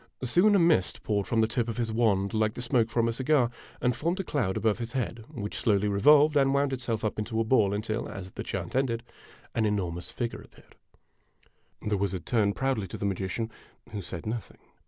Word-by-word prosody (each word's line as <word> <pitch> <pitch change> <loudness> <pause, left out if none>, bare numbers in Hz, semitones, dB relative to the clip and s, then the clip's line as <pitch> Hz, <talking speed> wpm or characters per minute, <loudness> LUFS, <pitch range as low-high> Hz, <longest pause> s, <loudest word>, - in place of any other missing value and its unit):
Soon, 180 - +4
a - - +6
mist 165 - +2
poured 100 -2 0
from 115 -1 +2
the 110 - +3
tip 120 +1 -1
of 115 - -4
his 115 -2 -1
wand, 105 -3 +1
like 110 0 +1
the - - -5
smoke 115 -2 +2
from 115 0 +1
a - - +1
cigar, 130 -1 +2 0.3
and 125 -1 +1
formed 170 +9 -1
a - - 0
cloud 115 - -1
above 110 -1 +1
his 115 -1 -5
head, 120 -3 -3
which 105 +1 -5
slowly 105 -4 +2
revolved 150 +9 +5
and 135 -1 +4
wound 140 -1 +2
itself 115 -4 -2
up 110 - -2
into 110 +1 -2
a - - +3
ball 110 -4 +3
until, 110 +2 -2
as 95 -3 -7
the - - -6
chant - - -4
ended, 120 -3 0 0.5
an 115 - +1
enormous 90 -5 -1
figure 120 -2 -4
appeared. - - -19 1.1
The 105 -1 +1
wizard 95 -3 -2
turned 105 -4 +2
proudly 130 -7 0
to - - -7
the - - -3
magician, 100 +4 -2 0.4
who 105 - -4
said 85 -2 -7
nothing. 115 +1 -5
115 Hz, 210 wpm, -28 LUFS, 105-125 Hz, 1.1 s, a